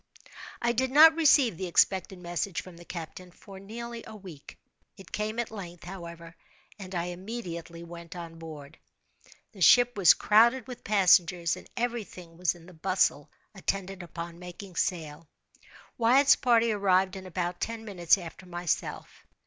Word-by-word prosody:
I 235 - +3
did 260 +2 0
not 315 +4 +8
receive 280 - +4
the 185 - -4
expected 190 +2 +2
message 175 +1 -3
from 185 -2 -13
the 175 - -13
captain 180 +1 -8
for 195 +2 -13
nearly 235 +3 -8
a 220 - -10
week. 180 -8 -12 0.4
It 195 -3 -14
came 215 +1 -3
at 235 -2 -2
length, 175 -5 -9
however, 170 -2 -9 0.4
and 190 -1 -8
I 170 - 0
immediately 175 -3 -7
went 170 +1 -10
on 165 -2 -9
board. 155 -2 -10 0.7
The 195 - -14
ship 245 +6 +6
was 190 -5 +6
crowded 235 +3 +4
with 250 -1 -10
passengers, 180 -4 +3
and - - -13
every 240 -1 -1
thing 175 -4 -13
was 175 0 0
in 170 -1 -16
the 185 - -14
bustle 180 -3 0 0.2
attendant 195 -1 -3
upon 170 0 -8
making 180 +1 -10
sail. 160 -3 -3 0.7
Wyatt's 265 +5 +5
party 235 -2 +3
arrived 190 -2 +2
in 190 -1 -8
about 175 -1 -3
ten 225 -1 -4
minutes 180 -4 +2
after 180 +1 -10
myself. 175 -1 -4
185 Hz, 155 wpm, -28 LUFS, 170-220 Hz, 0.7 s, not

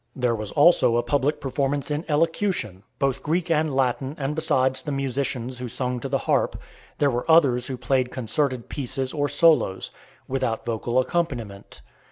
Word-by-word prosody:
There 125 -2 +1
was 110 -2 -4
also 145 -6 +5
a 120 - +1
public 145 +1 0
performance 140 +1 -1
in 150 +3 -2
elocution, 160 - 0 0.2
both 135 -1 0
Greek 165 +4 -1
and 155 -1 +2
Latin 135 +1 0
and 140 +1 -2
besides 130 -4 +1
the 145 - -5
musicians 130 -2 -3
who 125 - -4
sung 125 +1 -2
to 135 - -5
the 135 - +1
harp, - - +1 0.4
there 145 -1 +2
were 120 +5 -3
others 135 -7 +4
who 130 - -4
played 125 +1 0
concerted 130 +1 -2
pieces 130 -1 -3
or 145 -2 0
solos, 160 - +3 0.4
without 130 -4 -2
vocal 120 +1 -2
accompaniment. 130 -8 -2
135 Hz, 165 wpm, -24 LUFS, 125-150 Hz, 0.4 s, also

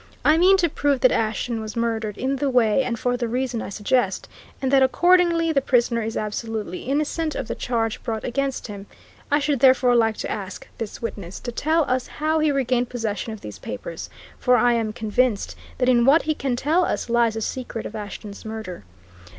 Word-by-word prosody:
I 310 - +6
mean 370 +4 +5
to 355 -2 +3
prove 285 -3 0
that 255 - +5
Ashton 225 +1 -1
was 215 -1 -6
murdered 225 -3 -2
in 270 +2 -1
the 280 +1 0
way, 245 -1 +3
and 245 -2 -2
for 245 +2 0
the 240 -1 -2
reason 245 -1 -2
I - - -5
suggest, 205 0 0 0.3
and 265 -1 -1
that 275 -1 +5
accordingly 340 +3 +4
the 275 - +3
prisoner 240 -3 +2
is 220 0 -3
absolutely 215 -3 -4
innocent 305 +3 -1
of 265 - -4
the - - -2
charge 225 -3 -2
brought 220 -3 -3
against 270 +2 -2
him. 200 -2 -8 0.4
I 290 - +4
should 290 -2 0
therefore 255 -1 +5
like 225 -2 +2
to - - -4
ask 200 -3 -6
this 225 0 -6
witness 195 -5 -5
to 240 - -5
tell 315 +6 +1
us 255 0 0
how 310 +1 -1
he 310 -1 +3
regained 250 -3 0
possession 225 -2 -3
of 220 - -8
these 105 -2 -9
papers, 105 - -7 0.3
for 250 0 +4
I 245 +1 +4
am 225 -2 0
convinced 220 0 0 0.2
that 250 - +1
in 240 -2 +4
what 280 +6 +5
he 310 - 0
can 270 -4 -2
tell 310 +8 +2
us - - -2
lies 235 -1 +2
the 225 - -3
secret 240 -1 -4
of 225 - -7
Ashton's 205 -1 -7
murder. 220 - -7
245 Hz, 205 wpm, -23 LUFS, 220-275 Hz, 0.4 s, I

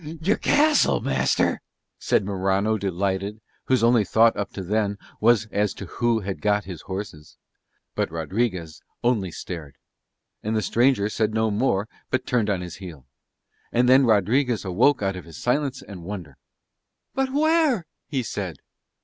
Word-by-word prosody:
"Your 185 +6 +1
castle, 300 0 +3
master!" 65 0 +1 0.4
said 100 - +1
Morano 100 +2 +1
delighted, 100 +1 -2 0.3
whose 130 -3 +2
only 115 -2 +5
thought 110 +4 +4
up 100 - -3
to 95 - -5
then 100 +1 0 0.2
was 115 0 +4
as 105 0 0
to 100 - -7
who 115 +4 0
had 95 -1 -5
got 105 0 +2
his 90 -5 -8
horses. 95 -6 -7 0.6
But - - -1
Rodriguez 85 0 -2 0.2
only 115 -6 +1
stared: 80 -4 -7 0.7
and 110 +1 -2
the 110 - 0
stranger 120 -4 +3
said 110 0 -1
no 110 -1 +2
more 105 -2 +1 0.2
but 130 - -1
turned 115 -4 +1
on 95 -3 0
his 90 -2 -7
heel. 85 -9 -10 0.7
And 125 +1 +3
then 130 0 +6
Rodriguez 115 +3 +2
awoke 110 +7 +3
out 95 -1 0
of 90 - -8
his 85 -2 -11
silence 135 +1 -1
and 95 -4 -10
wonder. 85 -7 -7 0.8
"But 270 -1 0
where?" 300 - +2 0.2
he 135 -4 -1
said. 100 -5 -4
105 Hz, 155 wpm, -24 LUFS, 95-120 Hz, 0.8 s, then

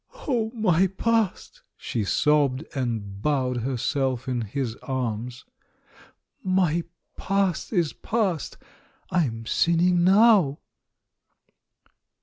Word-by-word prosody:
"Oh, 235 -6 0
my 190 -4 +3
past?" 220 +2 -1 0.2
she 115 - -3
sobbed, 145 +5 +2
and 110 -7 -3
bowed 130 -3 0
herself 130 +1 -1
in 125 -2 -1
his 115 +2 -3
arms. 125 -1 -4 1.0
"My 180 -3 +1 0.3
past 195 -3 -1
is 175 -8 +1
past 200 -8 -2 0.3
— - - -34
I'm 115 -11 0
sinning 175 +6 +2
now 195 -6 +5
150 Hz, 95 wpm, -25 LUFS, 125-185 Hz, 1.0 s, now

